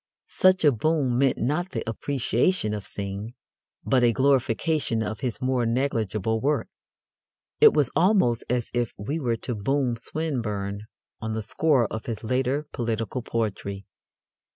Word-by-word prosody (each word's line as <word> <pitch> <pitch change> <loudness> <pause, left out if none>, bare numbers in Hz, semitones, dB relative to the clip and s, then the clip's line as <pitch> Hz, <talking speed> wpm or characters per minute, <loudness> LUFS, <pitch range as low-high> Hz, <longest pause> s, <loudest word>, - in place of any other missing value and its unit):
Such 185 -2 +4
a 145 - +7
boom 130 0 +1
meant 135 -2 +3
not 155 +10 -1
the - - -3
appreciation 120 - 0
of 105 -3 -5
Synge 100 +3 -5 0.5
but 130 -2 +3
a 120 - +5
glorification 130 -1 +1
of 110 -1 -4
his 125 -4 -3
more 130 -1 +1
negligible 110 -3 0
work. 145 +1 0 0.9
It - - +7
was 145 -5 +2
almost 180 - +3
as 120 -1 -1
if 120 -2 -1
we 140 +11 -3
were 120 -5 0
to 125 - -2
boom 125 +3 0
Swinburne 110 -8 -3 0.3
on 110 0 -3
the 110 0 -3
score 135 +3 +2
of 110 - -5
his 115 -3 -4
later 130 +5 0
political 115 0 -2
poetry. 100 -4 -3
120 Hz, 145 wpm, -25 LUFS, 110-140 Hz, 0.9 s, a